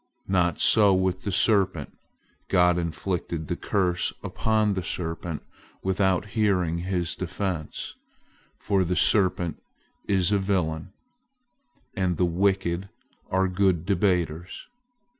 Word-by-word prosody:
Not 90 -3 +1
so 105 -3 +6
with 95 0 0
the 100 - -1
serpent. 95 -6 +1 0.5
God 90 -2 +4
inflicted 85 -1 -3
the - - -2
curse 90 -3 0
upon 110 -2 +1
the 95 - -2
serpent 80 -2 -4 0.4
without 95 0 +1
hearing 95 -6 +1
his 90 -1 -1
defense; 90 -7 -4 0.6
for 100 -2 +1
the 90 +1 -1
serpent 90 -3 +2 0.5
is 95 -1 +2
a 100 - +3
villain, 90 -3 -1 1.0
and 90 -3 0
the 90 - +3
wicked 95 +1 0 0.4
are 95 +1 +2
good 90 -2 +1
debaters. 90 -3 -1
90 Hz, 110 wpm, -26 LUFS, 85-95 Hz, 1.0 s, so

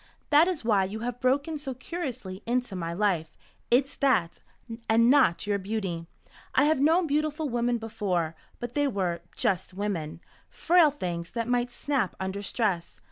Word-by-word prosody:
"That 300 +3 +7
is 345 -10 -2
why 205 -4 +3
you 210 +3 -6
have 245 +1 -3
broken 280 +5 +1
so 270 -3 -5
curiously 255 - -5
into 245 -3 0
my 170 -2 -3
life. 175 -4 0 0.3
It's 270 +3 +3
that 185 - +2 0.5
and 230 +2 +5
not 265 -11 +4
your 205 -1 0
beauty. 190 -5 -3 0.5
I - - +5
have 305 -1 +3
known 325 +5 +4
beautiful 305 +1 0
women 240 0 +1
before. 195 -8 -2 0.2
But 240 0 -5
they 290 -1 +2
were 185 -8 -1
just 185 0 -1
women, 175 -6 -3 0.3
frail 340 -2 +4
things 175 -12 -4
that 230 -1 -2
might 245 0 +1
snap 255 -4 -1
under 190 +1 -3
stress. 195 -5 -2
230 Hz, 160 wpm, -27 LUFS, 190-280 Hz, 0.5 s, That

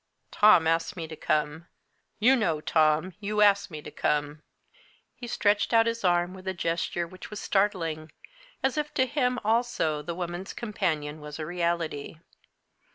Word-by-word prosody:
"Tom 205 -6 +6
asked 165 +2 0
me 165 -2 -4
to 160 - -8
come. 150 +2 -1 0.5
You 250 +5 +5
know, 170 -11 0
Tom, 155 +3 +2
you 210 0 -1
asked 200 -1 +4
me 155 -3 -8
to - - -9
come." 150 0 -1 0.7
He 245 - -9
stretched 210 0 +1
out 225 0 +6
his 230 -1 -2
arm 175 0 +2
with 190 0 -11
a 190 - -2
gesture 170 0 -1
which 185 +2 -11
was 210 - -6
startling, 165 -7 -1 0.5
as 265 +3 +1
if 300 0 -3
to 260 - +3
him 250 -1 0
also 220 -9 +1
the 170 +3 -5
woman's 175 +1 -5
companion 155 -9 -3
was 150 0 -8
a 155 - -4
reality. 170 -3 -2
175 Hz, 160 wpm, -27 LUFS, 155-210 Hz, 0.7 s, Tom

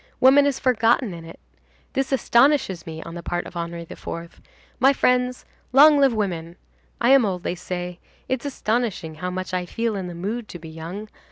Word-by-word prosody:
Woman 275 +2 +6
is 280 - 0
forgotten 235 -3 +2
in 165 -1 -9
it. 165 - -12 0.5
This 270 0 -1
astonishes 245 - +3
me 160 0 -6
on 165 - -9
the 170 - -6
part 175 +1 -3
of - - -11
Henri 170 0 -4
IV. 170 +1 -8 0.4
My 270 +3 +5
friends, 250 -1 +1 0.3
long 295 +2 +8
live 275 -2 +5
women! 175 -6 -3 0.4
I 240 +2 +3
am 270 -2 +7
old, 185 -4 -2
they - - -1
say; 180 0 -5 0.3
it's 260 -2 -2
astonishing 225 - -2
how 180 - -2
much 185 0 -5
I 180 -1 -1
feel 230 +3 -2
in 190 -2 -4
the 175 - -7
mood 210 +6 -4
to - - -8
be 160 -1 -11
young. 165 +7 -7
200 Hz, 190 wpm, -23 LUFS, 175-250 Hz, 0.5 s, long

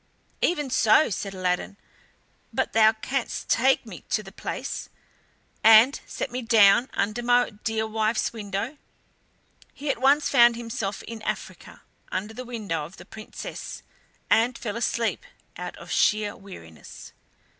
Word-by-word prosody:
"Even 295 -6 0
so," 235 +3 +4
said 195 +1 -4
Aladdin, 185 +1 -2 0.7
"but - - -1
thou 220 -1 +6
canst 245 +4 -4
take 260 +2 +3
me 205 -6 -10
to 215 - 0
the 195 - -11
palace, - - -5 0.7
and 225 +5 +7
set 255 - -4
me 250 +1 -3
down 225 +1 +5
under 210 +4 -1
my 245 0 +3
dear 220 +1 -2
wife's 220 +1 0
window." 215 +6 -4 1.0
He 285 0 -2
at 250 - -6
once 285 +3 +4
found 240 -3 +6
himself 230 -4 -4
in 230 -1 -8
Africa, - - -6 0.3
under 205 +4 -3
the 255 +3 -7
window 210 -10 -3
of 165 +6 -11
the - - -12
Princess, 215 -1 -8 0.4
and 235 +3 +3
fell 210 -3 -5
asleep 235 -1 -1 0.3
out - - -7
of - - -11
sheer 210 -1 +2
weariness. 85 - -12
225 Hz, 140 wpm, -25 LUFS, 205-245 Hz, 1.0 s, and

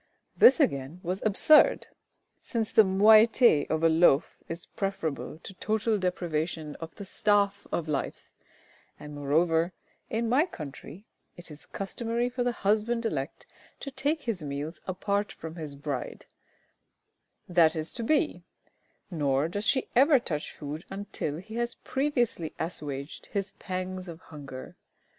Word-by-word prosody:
This 260 - +7
again 140 +5 0
was 185 +2 -2
absurd, 220 +9 +5 0.6
since 225 -3 -2
the 220 - +7
moiety 215 - +5
of 160 +1 0
a - - +7
loaf 160 -2 +4
is 165 +1 -6
preferable 195 -8 -4
to - - -8
total 215 +2 0
deprivation 165 -4 -2
of 165 -1 -9
the 200 - -8
staff 200 0 +1
of 165 - -2
life, 145 -3 -3 0.7
and 150 0 -9
moreover, 160 +4 +1 0.4
in 230 +1 -1
my 275 +9 +3
country, 155 - -9 0.3
it 175 -2 -10
is 150 - -12
customary 230 +4 -2
for 250 0 -2
the 245 - +1
husband 225 +2 0
elect 225 - -3 0.4
to 275 - -5
take 285 +3 -1
his 225 -8 -2
meals 150 +2 -5
apart 200 +2 -1
from 160 0 -8
his 150 -3 -6
bride 140 -3 -5 1.2
that 170 -2 +4
is 155 0 -4
to 240 - -4
be; 300 - +1 0.7
nor 145 -3 +1
does 205 +5 -4
she 260 - +2
ever 275 +4 +6
touch 155 -11 -3
food 150 +2 -7
until 195 -6 -4
he 220 +6 -8
has 240 0 -1
previously 245 - -1
assuaged 145 -3 -5
his 195 -1 -3
pangs 185 0 -4
of 165 -1 -8
hunger. 140 -6 -10
185 Hz, 140 wpm, -28 LUFS, 155-225 Hz, 1.2 s, This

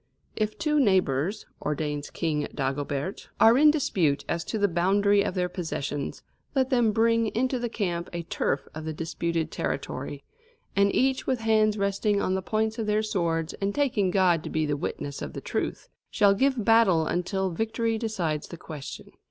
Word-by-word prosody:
"If 215 -1 -1
two 300 -2 +1
neighbours," 190 - +2 0.2
ordains 150 -1 -2
King 150 -3 -1
Dagobert, 140 +5 -3
"are 225 +1 +7
in 300 +3 +7
dispute 180 - +1
as 170 - -1
to 220 - -3
the 205 -1 +3
boundary 200 +3 +3
of 200 - -2
their 180 -1 +1
possessions, 160 -5 -4 0.3
let 265 0 +2
them 240 -4 +4
bring 230 +1 +3
into 255 +2 +1
the 240 0 -2
camp 175 -6 -2
a 170 -1 -4
turf 145 -3 -1
of 155 0 -7
the 160 - -3
disputed 165 0 -2
territory; 140 +1 -4 0.5
and 200 0 +4
each, 265 0 +1
with 255 -3 0
hands 215 -1 +3
resting 200 +1 +1
on 185 - 0
the 190 - 0
points 220 +3 -1
of 220 - -2
their 210 +1 +2
swords, 170 -6 -1
and 200 +1 -1
taking 240 -10 +1
God 180 -4 +3
to - - -5
be 155 -1 0
the 145 -1 0
witness 140 0 -4
of 70 - -5
the - - -5
truth, - - -3 0.2
shall 200 -1 +4
give 260 0 +1
battle 210 -8 +5
until 185 +3 -1
victory 225 +4 -1
decides 175 -10 -2
the 170 - -9
question." 150 -3 -8
195 Hz, 175 wpm, -27 LUFS, 160-220 Hz, 0.5 s, are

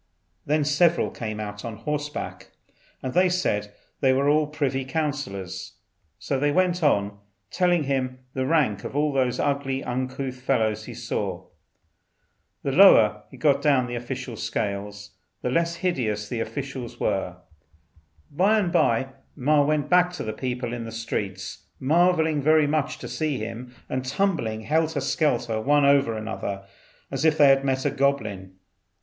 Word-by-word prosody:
Then 150 +1 +2
several 160 +4 +2
came 110 -2 -5
out 105 -1 -6
on 115 -2 -5
horseback, 150 +5 -5 0.5
and 130 - -3
they 185 0 +4
said 105 - -1 0.3
these 130 -1 +4
were 140 +2 +3
the 155 0 +2
privy 140 -3 -1
councillors. 140 - -4 0.4
So 135 - -2
they 145 +1 +2
went 180 +2 +2
on, 100 -9 +1 0.3
telling 175 -3 +2
him 130 -2 -1 0.2
the 130 0 -1
rank 135 -11 +1
of - - -6
all 150 0 +1
the 130 -2 +1
ugly 140 -1 -1
uncouth 130 +1 -4
fellows 110 -5 0
he - - -8
saw. - - -3 1.2
The 140 - -1
lower 110 - +6
they 130 - -13
got 140 0 +3
down 140 -3 +4
in 125 - -5
the - - -3
official 125 0 -5
scale 105 -2 -2 0.5
the 125 - 0
less 170 +4 +1
hideous 115 - -1
the 115 +1 -4
officials 135 0 -5
were. 90 -2 -1 0.9
By 195 +9 +3
and 190 -5 +1
by 120 -1 +2 0.3
Ma 145 +2 +3
went 150 0 0
back, 180 0 +4
the 110 -11 -4
people 125 -2 -3
in 120 -1 -4
the 115 - -7
streets 100 -4 -5
marvelling 160 +1 +3
very 155 +1 +4
much 155 +1 -1
to - - -8
see 155 -4 -2
him, 115 +3 -7
and 130 0 -2
tumbling 130 - -1
helter 160 +4 0
skelter 125 -6 0
one 145 +4 +3
over 140 -5 +3
another 100 -2 -5 0.5
as 135 +1 -2
if 160 -1 +3
they 145 -2 +7
had 135 0 +4
met 130 -1 0
a - - +2
goblin. 105 -9 -1
135 Hz, 155 wpm, -25 LUFS, 115-150 Hz, 1.2 s, they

